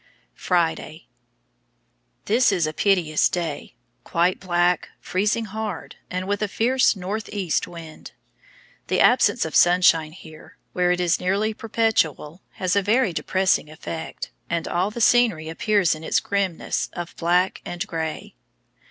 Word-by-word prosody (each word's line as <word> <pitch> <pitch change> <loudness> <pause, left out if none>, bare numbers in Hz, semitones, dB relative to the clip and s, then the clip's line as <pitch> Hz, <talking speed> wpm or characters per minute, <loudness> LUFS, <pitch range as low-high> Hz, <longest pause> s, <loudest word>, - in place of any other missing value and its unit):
Friday. 165 -2 -1 1.2
This 235 +3 +3
is 180 -5 +1
a 155 - -3
piteous 175 -5 +2
day, 165 -5 -4 0.3
quite 175 +2 +1
black, 175 -1 +1
freezing 210 +4 -1
hard, 210 -3 -6
and 185 +1 -4
with 205 0 -1
a 210 - +1
fierce 250 +5 +2
north 200 +3 -5
east 190 -6 -1
wind. 165 -2 -11 0.8
The - - 0
absence - - +4
of - - -5
sunshine 170 -3 +4
here, 160 -3 -14 0.2
where 180 -1 +2
it 180 - 0
is 175 -1 +1
nearly 200 +4 0
perpetual, 200 -8 -1
has 185 0 -1
a 200 - +4
very 215 0 +2
depressing 185 -2 0
effect, 160 +1 -7 0.2
and 170 -1 -2
all 180 +3 0
the 235 +3 -6
scenery 220 -10 +3
appears 200 +2 +2
in 155 0 -8
its - - +1
grimness 195 -4 -2
of 175 -1 -7
black 180 +2 +1
and 175 -1 -4
gray. 160 -2 -5
180 Hz, 140 wpm, -23 LUFS, 165-205 Hz, 1.2 s, absence